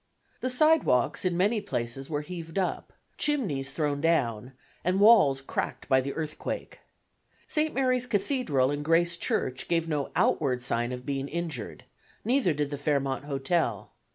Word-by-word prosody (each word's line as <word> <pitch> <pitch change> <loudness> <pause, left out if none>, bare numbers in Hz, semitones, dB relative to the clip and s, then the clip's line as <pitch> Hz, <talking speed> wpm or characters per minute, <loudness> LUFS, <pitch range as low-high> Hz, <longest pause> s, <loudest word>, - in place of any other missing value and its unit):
The 255 - -1
sidewalks 255 - +3
in 175 -2 +1
many 210 +4 +2
places 135 -7 -4
were 150 -1 -2
heaved 165 +1 -7
up, 190 - -2 0.3
chimneys 190 - 0
thrown 145 0 -1
down, 125 -7 0 0.3
and 185 +3 +1
walls 200 -11 +6
cracked 135 - -4
by 130 0 +4
the 140 +2 -5
earthquake. 155 -2 -5 0.7
St. 310 0 0
Mary's 255 -2 +1
Cathedral 205 - +1
and 145 0 -3
Grace 170 +2 +2
Church 130 -5 -2
gave 165 -1 +1
no 150 -3 -1
outward 125 -4 +1
sign 120 0 -1
of 125 0 -6
being 140 -1 -2
injured; 160 -8 -5 0.4
neither 245 -5 +3
did 145 -1 -2
the 145 - -4
Fairmont 140 -2 -1
Hotel. 135 - -1
150 Hz, 150 wpm, -28 LUFS, 135-190 Hz, 0.7 s, walls